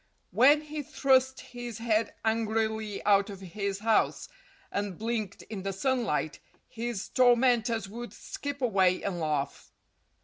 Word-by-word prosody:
When 270 Hz, -, +6 dB
he 305 Hz, 0 st, -5 dB
thrust 265 Hz, -1 st, +2 dB
his 245 Hz, -2 st, -7 dB
head 225 Hz, -1 st, 0 dB
angrily 220 Hz, -1 st, -1 dB
out 200 Hz, 0 st, +4 dB
of 195 Hz, -2 st, -8 dB
his 200 Hz, +1 st, -3 dB
house 220 Hz, -1 st, +1 dB, 0.4 s
and 200 Hz, -3 st, -3 dB
blinked 220 Hz, -3 st, -3 dB
in 210 Hz, -3 st, -7 dB
the 195 Hz, +1 st, -2 dB
sunlight, 220 Hz, -, -1 dB, 0.3 s
his 230 Hz, -3 st, -4 dB
tormentors 240 Hz, -3 st, +3 dB
would 235 Hz, +4 st, -7 dB
skip 285 Hz, -1 st, -6 dB
away 190 Hz, -6 st, +3 dB
and 190 Hz, -3 st, -2 dB
laugh. 150 Hz, -3 st, -2 dB
220 Hz, 130 wpm, -29 LUFS, 195-245 Hz, 0.4 s, When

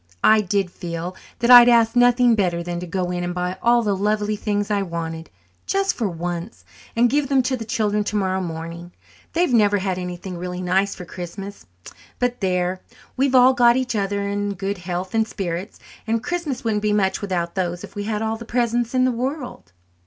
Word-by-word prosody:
I 215 Hz, 0 st, +6 dB
did 195 Hz, -2 st, -1 dB
feel 175 Hz, +1 st, -5 dB, 0.2 s
that 235 Hz, +1 st, +2 dB
I'd 245 Hz, 0 st, +10 dB
ask 230 Hz, -1 st, +4 dB
nothing 245 Hz, 0 st, +5 dB
better 180 Hz, -5 st, 0 dB
than 175 Hz, 0 st, -4 dB
to 180 Hz, -, -6 dB
go 180 Hz, 0 st, -2 dB
in 175 Hz, 0 st, -2 dB
and 175 Hz, 0 st, -3 dB
buy 180 Hz, +1 st, -3 dB
all 235 Hz, 0 st, +4 dB
the 205 Hz, -2 st, +1 dB
lovely 210 Hz, +1 st, 0 dB
things 205 Hz, 0 st, -2 dB
I 205 Hz, -1 st, +1 dB
wanted, 165 Hz, -3 st, -5 dB, 0.4 s
just 390 Hz, 0 st, +1 dB
for 220 Hz, -5 st, -2 dB
once, 175 Hz, +3 st, -5 dB, 0.3 s
and 235 Hz, +1 st, +4 dB
give 280 Hz, +2 st, 0 dB
them 270 Hz, -2 st, +3 dB
to 260 Hz, +1 st, 0 dB
the 230 Hz, -3 st, -6 dB
children 210 Hz, -1 st, 0 dB
tomorrow 190 Hz, -2 st, -1 dB
morning. 170 Hz, +1 st, -6 dB, 0.4 s
They've 340 Hz, -5 st, +1 dB
never 205 Hz, -3 st, +4 dB
had 190 Hz, -1 st, -2 dB
anything 180 Hz, 0 st, -6 dB
really 180 Hz, 0 st, -5 dB
nice 190 Hz, +2 st, +1 dB
for 180 Hz, -, -9 dB
Christmas. 195 Hz, +3 st, -8 dB, 0.5 s
But 245 Hz, -1 st, -1 dB
there! 180 Hz, -1 st, 0 dB, 0.3 s
We've 265 Hz, 0 st, +1 dB
all 255 Hz, +1 st, +7 dB
got 240 Hz, -1 st, +5 dB
each 255 Hz, -3 st, -1 dB
other 200 Hz, 0 st, -1 dB
and 200 Hz, 0 st, -2 dB
good 195 Hz, +1 st, -3 dB
health 180 Hz, +1 st, -4 dB
and 225 Hz, -1 st, +2 dB
spirits, 185 Hz, -1 st, -5 dB, 0.3 s
and 225 Hz, +1 st, +2 dB
a -, -, -7 dB
Christmas 320 Hz, -2 st, -3 dB
wouldn't 215 Hz, -2 st, 0 dB
be 210 Hz, 0 st, +1 dB
much 195 Hz, -2 st, +1 dB
without 175 Hz, -4 st, -2 dB
those 175 Hz, -2 st, -2 dB
if -, -, -10 dB
we 205 Hz, 0 st, -4 dB
had 215 Hz, 0 st, -2 dB
all 220 Hz, 0 st, -1 dB
the 235 Hz, -, -9 dB
presents 240 Hz, +1 st, 0 dB
in 255 Hz, 0 st, +4 dB
the 255 Hz, -, +2 dB
world." 255 Hz, -, -5 dB
205 Hz, 205 wpm, -22 LUFS, 180-235 Hz, 0.5 s, I'd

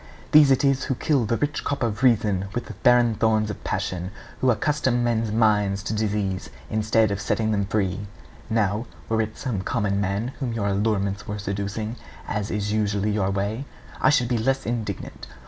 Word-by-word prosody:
These 150 Hz, -2 st, +8 dB
it 135 Hz, +1 st, +3 dB
is 135 Hz, -1 st, +2 dB
who 130 Hz, -, -1 dB
kill 135 Hz, -2 st, +1 dB
the 115 Hz, -, +1 dB
rich 145 Hz, 0 st, -1 dB
crop 140 Hz, -2 st, -2 dB
of 115 Hz, -1 st, -1 dB
reason 105 Hz, -6 st, +3 dB
with 120 Hz, -, -2 dB
the -, -, -8 dB
barren 120 Hz, -2 st, +4 dB
thorns 110 Hz, -1 st, +1 dB
of -, -, -9 dB
passion, 95 Hz, -1 st, -2 dB, 0.3 s
who 130 Hz, -, +2 dB
accustom 125 Hz, +1 st, +1 dB
men's 115 Hz, -2 st, 0 dB
minds 105 Hz, -3 st, +2 dB
to 110 Hz, -, -3 dB
disease, 105 Hz, -4 st, -1 dB, 0.2 s
instead 110 Hz, 0 st, +2 dB
of 100 Hz, 0 st, -2 dB
setting 110 Hz, 0 st, 0 dB
them 100 Hz, -2 st, 0 dB
free. 100 Hz, -1 st, -1 dB, 0.4 s
Now, 110 Hz, +1 st, 0 dB, 0.2 s
were 110 Hz, 0 st, +2 dB
it 110 Hz, 0 st, -4 dB
some 110 Hz, -7 st, -2 dB
common 100 Hz, -2 st, 0 dB
man 100 Hz, +5 st, -1 dB
whom 125 Hz, -5 st, -2 dB
your 110 Hz, -3 st, -2 dB
allurements 100 Hz, 0 st, 0 dB
were 105 Hz, -, -3 dB
seducing, 100 Hz, +3 st, -3 dB, 0.3 s
as 105 Hz, -1 st, -2 dB
is 105 Hz, 0 st, -2 dB
usually 105 Hz, -1 st, +1 dB
your 100 Hz, -2 st, +1 dB
way, 100 Hz, +6 st, -2 dB, 0.4 s
I -, -, +5 dB
should 125 Hz, -5 st, +3 dB
be 120 Hz, -1 st, 0 dB
less 135 Hz, +4 st, 0 dB
indignant. 110 Hz, -4 st, -4 dB
110 Hz, 185 wpm, -24 LUFS, 100-120 Hz, 0.4 s, These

